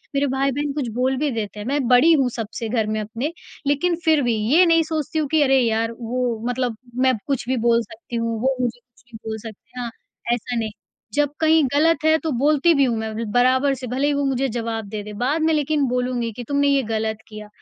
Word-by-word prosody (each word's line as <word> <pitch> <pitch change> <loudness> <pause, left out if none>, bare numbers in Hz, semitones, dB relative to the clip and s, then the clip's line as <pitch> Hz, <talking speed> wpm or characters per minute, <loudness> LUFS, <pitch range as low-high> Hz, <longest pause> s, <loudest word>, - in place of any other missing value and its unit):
मेरे 280 +1 +2
भाई-बहन 275 +2 -1
कुछ 280 -4 -2
बोल 260 +2 +1
भी 295 +1 0
देते 210 -2 -4
हैं, 205 - -6
मैं 280 -2 0
बड़ी 255 +7 +6
हूँ 270 -5 +3
सबसे 225 -1 -5
घर 220 -2 0
में 215 0 -1
अपने 230 +9 -4 0.4
लेकिन 330 +5 +2
फिर 315 -3 +4
भी 240 -2 +1 0.2
ये 360 +3 +7
नहीं 330 -1 +4
सोचती 315 0 -2
हूँ 300 - 0
कि 315 -1 +3
अरे 270 -1 +4
यार! 225 -1 +1
वो 240 0 -2
मतलब 245 -3 -2 0.2
मैं 260 0 +3
कुछ 270 -3 -2
भी 260 - +1
बोल 235 0 +3
सकती 230 +1 -10
हूँ। 230 -1 -1
वो 265 +1 +1
मुझे 245 -1 -2
कुछ 240 -1 -29
भी - - -7
बोल 220 - -3
सकते 230 +3 -11
हाँ, 240 -1 -3 0.4
ऐसा 245 +1 -3
नहीं, 220 -2 -2 0.4
जब 290 -1 +2
कहीं 320 -1 +4
गलत 305 +1 +3
है 315 0 +5
तो 320 - -1
बोलती 300 +4 +4
भी 280 -3 +3
हूँ 235 -2 0
मैं 220 0 -3
उन्हें 220 -1 -4
बराबर 260 +3 +3
से 255 -1 -7
भले 260 +4 0
ही 290 - +2
वो 285 - 0
मुझे 270 0 0
जवाब 225 -2 -3
दें 210 0 -5
दें 210 -1 -8
बाद 285 +7 0
में 320 0 +3
लेकिन 295 -1 +1
बोलूँगी 250 -1 -1
कि, 245 +3 -8
"तुमने 285 0 +2
ये 275 -2 +3
गलत 220 0 -2
किया, 215 -1 -9
255 Hz, 235 wpm, -22 LUFS, 230-285 Hz, 0.4 s, ये